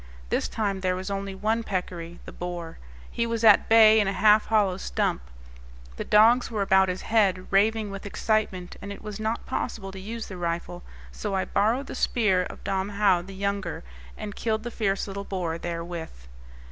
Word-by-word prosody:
This - - 0
time 200 -3 -2
there 185 -1 +1
was 185 +2 -5
only 195 -1 -4
one 220 +4 0
peccary, 180 -4 -4
the - - -8
boar. 175 -2 -6 0.3
He 235 - -1
was 230 -1 -2
at 215 -2 +6
bay 220 -1 +7
in 205 - +2
a 195 - 0
half 210 +1 +4
hollow 205 -4 +2
stump. 60 - -1 0.8
The - - -3
dogs 230 +4 +5
were 215 -3 -1
about 190 -1 +4
his 180 0 -4
head, 195 -5 +2
raving 210 +1 +2
with 195 +1 -7
excitement, 200 -4 -1
and 200 - -7
it 200 - -9
was 210 -1 -6
not 220 +1 -2
possible 220 -6 -4
to 190 - -9
use 225 +4 -6
the 190 - -8
rifle; 170 0 -3 0.3
so 205 -2 -4
I 190 - 0
borrowed 225 +7 +1
the - - -7
spear 210 -7 +2
of - - -10
Dom 190 0 -1
Joao 195 -4 +4
the 190 +2 -10
younger, 200 - -3 0.3
and 205 -1 -6
killed 220 -1 -1
the 240 - -5
fierce 200 -4 -1
little 200 0 -5
boar 175 -4 -3
therewith. 170 - -6
200 Hz, 190 wpm, -26 LUFS, 185-215 Hz, 0.8 s, bay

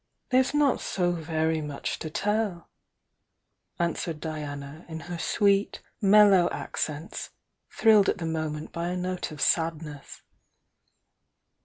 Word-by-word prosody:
''There's 255 +1 +4
not 290 -3 +3
so 180 -2 0
very 160 -1 -1
much 145 -2 -4
to 160 - -5
tell," 205 0 -1 1.1
answered 170 -2 -2
Di 155 0 -4
ana, 145 +2 -7
in 160 0 -6
her 175 -1 -6
sweet, 200 +3 +2 0.2
mellow 200 -3 +6
accents, 155 +2 -4 0.4
thrilled 215 -3 +5
at - - 0
the 170 - -4
moment 155 -1 -3
by 170 0 -3
a 180 +1 -2
note 180 0 -3
of 155 -2 -10
sadness. 160 -3 -1
170 Hz, 125 wpm, -27 LUFS, 155-195 Hz, 1.1 s, mellow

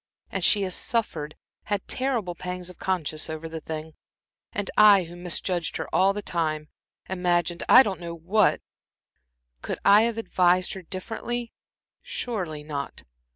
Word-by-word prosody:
And 190 - -2
she 200 +3 +4
has 185 -1 0
suffered 160 -11 -1 0.3
had 205 -2 -2
terrible 245 -9 -1
pangs 180 0 -6
of 180 - -19
conscience 160 -5 -1
over 160 +1 -5
this 160 -1 -7
thing. 160 0 -6 0.6
And 205 -1 -3
I 205 -3 +7
who 170 +1 -10
misjudged 175 0 -1
her - - -4
all 195 +1 +5
this 205 +1 -5
time 155 -4 -2 0.4
imagined 175 -2 0
I 255 - +10
don't 195 -5 -3
know 170 -1 -6
what 185 +5 +2 1.0
could - - -4
I 200 +1 +8
have 230 - -6
advised 180 -4 +2
her 190 - -7
differently? 230 +6 -5 0.5
Surely 220 - -4
not. 145 -2 -5
180 Hz, 150 wpm, -26 LUFS, 165-205 Hz, 1.0 s, I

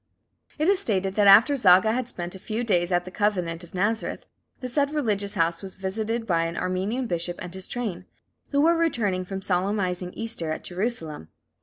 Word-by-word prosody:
It 310 +2 +1
is 395 -1 +4
stated 195 -3 0
that 205 0 +3
after 220 +9 +8
Zaga 205 -3 +5
had 250 0 -2
spent 175 -7 -4
a 190 - -8
few 220 +5 -3
days 175 -6 +2
at 175 0 +1
the 185 - -8
Convent 180 -5 -1
of 175 - -13
Nazareth, 210 +4 -1 0.3
the 255 - -5
said 280 +3 +1
religious 210 -9 -1
house 165 -2 +1
was 190 -1 -8
visited 220 +4 -3
by 165 -5 +1
an 165 0 -4
Armenian 190 +8 -1
bishop 175 -3 -3
and 180 - -7
his 190 0 -3
train, 200 -7 -4 0.4
who 285 0 +2
were 335 +3 +4
returning 220 - 0
from 195 +1 -6
solemnizing 185 -1 -1
Easter 225 -8 -3
at 155 - -4
Jerusalem. 175 - -3
195 Hz, 190 wpm, -25 LUFS, 180-230 Hz, 0.4 s, after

